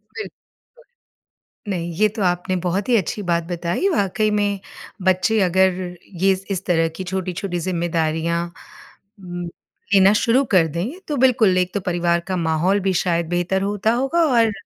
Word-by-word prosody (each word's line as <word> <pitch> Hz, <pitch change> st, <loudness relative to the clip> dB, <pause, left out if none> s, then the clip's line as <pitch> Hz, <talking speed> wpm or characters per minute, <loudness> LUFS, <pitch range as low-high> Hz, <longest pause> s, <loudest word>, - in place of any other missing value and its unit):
bill 420 Hz, -, -5 dB, 1.4 s
नहीं, 175 Hz, -4 st, -3 dB
ये 215 Hz, -, +4 dB
तो 215 Hz, +1 st, -6 dB
आपने 180 Hz, +1 st, 0 dB
बहुत 185 Hz, +4 st, -2 dB
ही 245 Hz, -, +4 dB
अच्छी 210 Hz, +1 st, -2 dB
बात 170 Hz, -2 st, 0 dB
बताई, 175 Hz, -, -2 dB
वाक़ई 215 Hz, -, +1 dB
में 205 Hz, -1 st, 0 dB, 0.4 s
बच्चे 185 Hz, +4 st, +2 dB
अगर 185 Hz, -1 st, +1 dB, 0.3 s
ये 195 Hz, 0 st, +5 dB, 0.2 s
इस 190 Hz, -1 st, -3 dB
तरह 165 Hz, -2 st, +2 dB
की 190 Hz, -, -4 dB
छोटी-छोटी 185 Hz, 0 st, -3 dB
जिम्मेदारियाँ 170 Hz, -1 st, -1 dB, 0.7 s
म 175 Hz, -2 st, -6 dB, 0.4 s
लेना 195 Hz, 0 st, +6 dB
शुरू 230 Hz, +5 st, +3 dB
कर 180 Hz, -5 st, +5 dB
दें 180 Hz, -, -4 dB
तो 300 Hz, -, -2 dB
बिल्कुल, 230 Hz, -7 st, +4 dB
एक 185 Hz, 0 st, 0 dB
तो 205 Hz, -, 0 dB
परिवार 175 Hz, -1 st, +1 dB
का 190 Hz, -, -1 dB
माहौल 170 Hz, +4 st, +1 dB
भी 190 Hz, 0 st, 0 dB
शायद 170 Hz, -2 st, 0 dB
बेहतर 175 Hz, +2 st, 0 dB
होता 205 Hz, +2 st, 0 dB
होगा 270 Hz, +7 st, 0 dB, 0.2 s
और 225 Hz, -2 st, +4 dB
185 Hz, 155 wpm, -21 LUFS, 175-205 Hz, 1.4 s, लेना